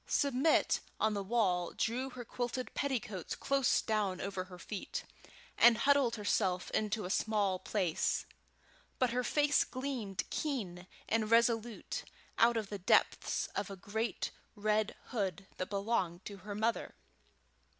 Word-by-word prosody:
Submit 280 +2 +3 0.2
on 220 0 +2
the 200 - -1
wall 190 -5 +1
drew 250 +4 0
her 250 -2 -8
quilted 245 +2 -3
petticoats 225 - -2
close 275 -2 +2
down 205 -4 0
over 195 -2 -3
her 180 -1 -11
feet, 200 +2 -5 0.6
and 235 -1 +8
huddled 280 -3 +4
herself 195 -4 0
into 215 -1 0
a 180 - -3
small 205 -4 +1
space, 185 -4 +1 0.7
but 255 -2 +2
her 250 +1 0
face 290 +2 +3
gleamed 255 -8 -3
keen 190 - -3 0.2
and 220 -1 +1
resolute 230 0 +2 0.4
out 235 0 +5
of 215 -3 -2
the 205 - -4
depths 185 - +2
of 200 - -2
a 195 - -6
great 220 +5 -2 0.2
red 215 +1 +1
hood 195 -5 -2
that 185 - -3
belonged 195 -4 -1
to 200 - -7
her 200 +2 -7
mother. 225 +2 -1
215 Hz, 140 wpm, -34 LUFS, 195-240 Hz, 0.7 s, and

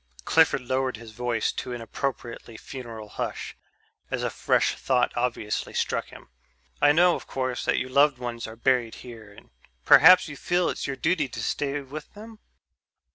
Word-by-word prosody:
Clifford 160 -4 +4
lowered 130 -1 -1
his 115 -1 -11
voice 120 -1 -1
to 125 - -5
an 120 - -5
appropriately 115 -1 -5
funeral 115 -5 -9
hush, - - -5 0.5
as - - -2
a - - -1
fresh - - +1
thought 125 -2 0
obviously 120 -3 -2
struck - - -1
him. - - -14 0.5
"I 145 - +6
know, 175 +3 +5
of - - -6
course, 130 -2 -3
that - - +1
your 130 - -3
loved 140 0 +4
ones 120 -2 -5
are 110 - -9
buried 120 -1 +1
here 110 -4 -11
and 100 - -17 0.3
perhaps 180 +3 +8
you 150 - -8
feel 175 +4 0
it's - - -4
your 140 - -3
duty 160 0 0
to 115 -2 -6
stay 145 +3 -2
with 145 +3 -9
them...?" 220 +1 -12
130 Hz, 175 wpm, -26 LUFS, 115-145 Hz, 0.5 s, perhaps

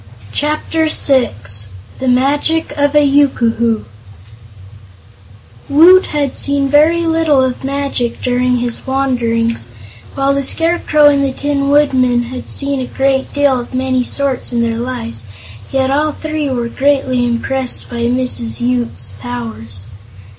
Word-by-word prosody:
Chapter 310 +2 -1
Six 105 - +1 0.3
The 265 - -3
Magic 285 +6 +1
of 285 0 +1
a 295 -1 +5
Yookoohoo 235 -5 +1 1.9
Woot 345 +6 +6
had 285 -3 -2
seen 280 -1 0
very 315 +4 +3
little 320 -4 +2
of 255 0 -3
magic 275 -3 -2
during 250 0 0
his 240 +1 -4
wanderings, 235 - -1 0.5
while 275 0 +1
the 280 - 0
Scarecrow 325 +1 +2
and 285 -1 +4
the 275 - 0
Tin 280 +1 -1
Woodman 260 -4 +2
had 250 +1 -8
seen 280 -1 -1
a 255 - -4
great 270 0 -1
deal 285 -3 +2
of 245 +1 -8
many 255 -1 0
sorts 275 0 -1
in 235 -1 0
their 230 0 -2
lives, 115 - -6 0.4
yet 265 0 0
all 300 +2 +1
three 310 -2 -3
were 240 -3 -2
greatly 265 -1 0
impressed 245 +2 -2
by 235 -1 -3
Mrs. 245 -1 -1
Yoop's 240 - -3
powers. 110 -4 -3
265 Hz, 130 wpm, -15 LUFS, 240-285 Hz, 1.9 s, Woot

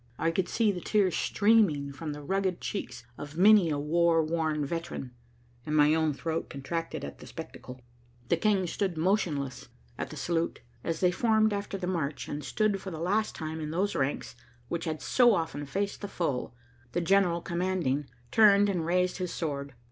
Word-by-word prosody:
I 165 - +1
could 180 +2 -1
see 225 -3 +2
the 180 -3 -5
tears 195 -4 +2
streaming 200 -10 +3
from 155 +2 -5
the 145 0 -7
rugged 190 +2 0
cheeks 125 -11 -5
of 145 +2 -8
many 200 -2 +6
a 150 - 0
war 165 +2 +3
worn 155 -2 0
veteran, 165 -4 -4 0.5
and 150 - -2
my 150 0 +5
own 160 -1 +2
throat 160 +3 -3
contracted 165 - -4
at 70 - -9
the - - -11
spectacle. 125 0 -9 0.5
The - - +4
King 195 +1 +2
stood 180 0 -2
motionless 160 - 0 0.3
at - - -3
the - - -8
salute. 170 -1 -1 0.2
As 165 -1 -2
they 180 -1 +4
formed 220 +1 +3
after 200 -1 -3
the 185 - -4
march, 155 -7 -2
and 145 0 -4
stood 205 +4 0
for 195 - -6
the 165 - -6
last 205 +6 0
time 160 0 -5
in 150 - -4
those 190 +6 0
ranks 135 -2 -2 0.3
which 170 -1 -2
had 155 -2 -3
so 240 -3 +5
often 160 -4 -3
faced 200 +7 -2
the 205 - -4
foe, 150 -12 -2 0.4
the 175 - +1
general 175 -1 +3
commanding 170 -6 -1 0.2
turned 205 -2 +6
and 175 -4 -1
raised 180 +1 +1
his 180 -1 -2
sword. 140 -4 -4
170 Hz, 185 wpm, -29 LUFS, 150-195 Hz, 0.5 s, many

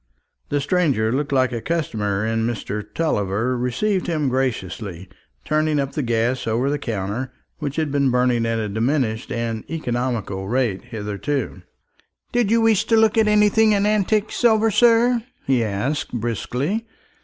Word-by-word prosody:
The 145 - +1
stranger 140 - +1
looked 145 +3 -1
like 130 -2 +2
a 120 -2 -3
customer, 110 -11 -1
and 115 +1 0
Mr. 105 -2 -4
Tulliver 115 - 0
received 150 - -1
him 155 -5 0
graciously, 100 -8 -3 0.4
turning 155 -1 +1
up 140 -1 -1
the 150 - -2
gas 120 0 0
over 120 +5 +1
the 145 - -1
counter, 110 +4 -3 0.3
which 140 -1 -3
had 155 -3 -1
been 140 -1 +2
burning 125 -2 +2
at 115 0 0
a 110 -1 -2
diminished 115 +2 -1
and 115 -2 -2
economical 120 -10 -2
rate 120 -4 0
hitherto. 110 0 -3 0.7
"Did 240 -4 +1
you 230 +1 +3
wish 225 -3 +3
to 225 - +3
look 220 0 +4
at 220 -1 +4
anything 210 +1 +4
in 200 0 +2
antique 210 0 +1
silver, 225 -2 +3
sir?" 235 +2 +4 0.2
he 130 -3 +2
asked 115 +8 -2
briskly. 125 - -2
130 Hz, 155 wpm, -22 LUFS, 115-170 Hz, 0.7 s, look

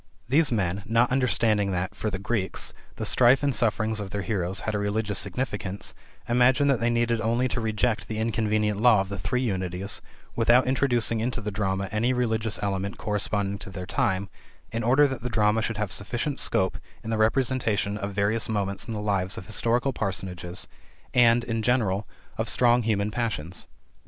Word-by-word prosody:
These 145 +4 +3
men, 100 -4 0
not 115 +3 +3
understanding 115 -6 +2
that, 90 +1 -2
for 110 - -3
the 95 - -3
Greeks, 100 -1 -2 0.2
the - - -4
strife 130 +3 +4
and 140 -1 +2
sufferings 110 -2 +1
of 100 -2 -5
their 100 +1 -3
heroes 95 -1 -2
had 110 - -2
a 105 - 0
religious 105 0 -1
significance, 100 -6 -3 0.3
imagined 130 +4 +4
that 130 - +1
they 115 +1 +1
needed 120 -1 +1
only 120 +3 +1
to 115 +1 -2
reject 110 +1 0
the 110 - -4
inconvenient 110 -2 0
law 115 -4 +6
of 95 - -5
the 100 -1 -5
three 125 0 -1
Unities, 95 -2 0 0.3
without 120 +2 +4
introducing 125 -3 +1
into 120 +2 -1
the 105 -1 -4
drama 95 -1 -1
any 115 +4 +1
religious 110 -3 0
element 100 0 -2
corresponding 100 -1 -1
to - - -9
their 90 -1 -6
time, 95 +1 0 0.4
in 115 - -2
order 135 +5 +5
that 130 -2 -5
the 125 - -3
drama 110 -1 +2
should 115 -1 -2
have 105 -2 -2
sufficient 120 - -2
scope - - +1 0.2
in 110 - -4
the 110 - 0
representation 110 -3 +1
of 100 -1 -4
various 105 +3 0
moments 100 -2 -2
in 115 - -4
the - - -3
lives 100 -2 -1
of - - -7
historical 120 +5 +1
personages 95 -4 -3 0.5
and, 120 -1 +5
in 115 -1 -2
general, 105 -4 +1 0.3
of - - 0
strong 120 0 +4
human 105 -2 0
passions. 100 -8 -3
110 Hz, 180 wpm, -26 LUFS, 100-120 Hz, 0.5 s, law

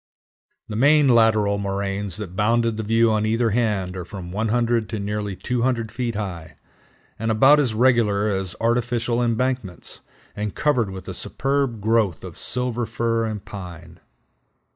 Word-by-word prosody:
The 105 - -6
main 145 +5 +5
lateral 110 -4 +4
moraines 100 -1 -2
that 95 -4 -6
bounded 115 +2 +2
the 110 - -3
view 115 +1 +3
on 110 -1 +1
either 115 +1 +1
hand 100 -5 0
are 90 - -4
from 90 0 -8
100 115 +2 0
to 110 - -3
nearly 105 -1 -3
200 120 0 -1
feet 120 -1 -3
high, 85 -6 -5 0.6
and 115 +1 -1
about 135 +7 +6
as 125 -7 0
regular 110 -4 +3
as 95 -3 -2
artificial 120 0 0
embankments, 120 - -2 0.4
and 105 -1 -4
covered 130 -8 +1
with 95 -1 -8
a - - -4
superb 135 -4 -1
growth 110 -5 +1
of - - -8
Silver 125 -2 -1
Fir 115 -1 0
and 105 -3 -5
Pine. 85 -3 -9
110 Hz, 150 wpm, -23 LUFS, 100-120 Hz, 0.6 s, about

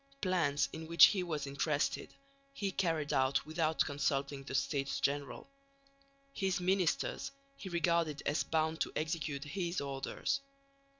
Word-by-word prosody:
Plans, 170 - +1
in 160 0 -6
which 170 +1 +9
he 195 - 0
was 155 -5 -2
interested, 140 +2 -1 0.4
he 200 -7 -2
carried 165 -6 0
out 130 +1 +2
without 160 0 +1
consulting 140 -1 -1
the 135 - -5
States 140 -1 0
General. 140 - -2 0.9
His 195 -4 0
ministers 180 -1 +1 0.3
he 190 - -8
regarded 170 -3 +1
as 145 - +1
bound 160 0 0
to - - 0
execute 155 -3 -2
his 175 +3 -2
orders. 140 - -2
155 Hz, 130 wpm, -34 LUFS, 140-175 Hz, 0.9 s, which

